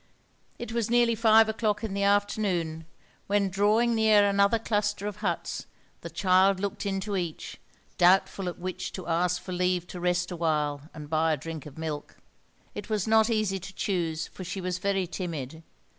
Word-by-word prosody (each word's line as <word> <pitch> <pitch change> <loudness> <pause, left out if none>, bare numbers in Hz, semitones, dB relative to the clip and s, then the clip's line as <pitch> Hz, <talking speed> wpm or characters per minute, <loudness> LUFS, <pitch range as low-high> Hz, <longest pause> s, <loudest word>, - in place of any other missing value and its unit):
It 240 - -6
was 230 -2 -1
nearly 240 0 +4
five 225 0 +5
o'clock 220 -1 -1
in 215 -3 -3
the 200 - -2
afternoon 200 -5 0 0.4
when, 200 -1 +1
drawing 215 +5 +3
near 215 -2 +5
another 200 +2 +3
cluster 205 -2 -1
of 210 -1 -4
huts, 185 -5 -3 0.3
the 170 - -7
child 185 +3 +3
looked 200 +1 -3
into 195 +1 -2
each, 175 -4 -4 0.4
doubtful 185 +1 +3
at 175 - -8
which 185 +1 -5
to 185 - -6
ask 175 +1 +1
for 185 - -9
leave 180 -1 0
to 180 - -7
rest 175 0 0
awhile 150 -3 -1
and 150 -2 -8
buy 160 +1 +2
a - - -1
drink 160 -2 -7
of 145 - -13
milk. 155 -2 -5 0.6
It - - -7
was 215 -1 -1
not 220 0 +4
easy 215 -4 0
to 190 +2 -10
choose, 170 -4 -1
for 185 - -10
she 185 +2 -5
was 185 -1 -3
very 195 -1 0
timid. 160 -5 -5
190 Hz, 175 wpm, -27 LUFS, 170-205 Hz, 0.6 s, five